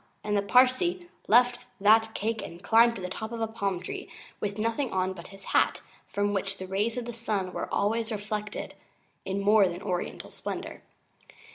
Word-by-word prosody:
and 210 0 0
the 200 - +3
Parsee 255 - +3 0.2
left 245 +2 +4
that 220 +2 +5
cake 220 +1 -1
and 170 +2 -9
climbed 230 +2 +5
to 190 - -7
the - - -2
top 220 +4 -5
of 235 - -4
a 225 - +1
palm 200 -5 -2
tree 180 - -6 0.3
with 200 0 -3
nothing 230 +5 0
on 185 0 0
but 170 -2 -10
his 195 -1 -13
hat, - - +3 0.2
from 205 0 0
which 195 0 -1
the 190 - -6
rays 205 +5 -1
of 245 - -3
the 240 - -5
sun 210 -5 -2
were - - -4
always 225 +2 0
reflected 210 0 -4 0.5
in 190 +1 -1
more 205 0 +5
than 175 +2 -5
oriental 180 -3 -3
splendour. - - -6
210 Hz, 185 wpm, -28 LUFS, 195-230 Hz, 0.5 s, that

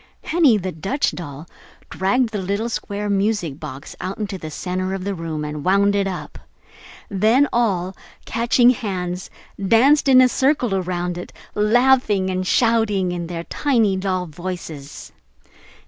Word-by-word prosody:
Henny, 310 -10 +4
the 185 -2 -3
Dutch 195 - -1
doll, 155 -2 -8 0.4
dragged 230 +6 +1
the 210 -3 -3
little 200 +5 -2
square 205 -2 -4
music 200 -7 0
box 140 -1 -8
out 190 +1 -4
into 205 -3 -4
the 155 - -6
center 185 +4 -3
of 190 - -5
the 200 +1 -2
room 160 -4 -4
and 150 -1 -5
wound 200 +2 +3
it 200 -1 +1
up. 185 -2 -6 0.7
Then 220 +7 +3
all, 195 -6 0 0.3
catching 240 +1 +3
hands, 185 -6 -4 0.3
danced 265 +9 +4
in 260 -1 +7
a 255 - +7
circle 260 -3 +1
around 180 -2 -2
it, 180 - -8 0.2
laughing 210 -3 +3
and 185 0 -2
shouting 220 -6 +2
in 175 -1 -4
their 170 -1 -5
tiny 230 - +1
doll 185 -1 -1
voices. 165 -4 -7
195 Hz, 145 wpm, -21 LUFS, 180-225 Hz, 0.7 s, in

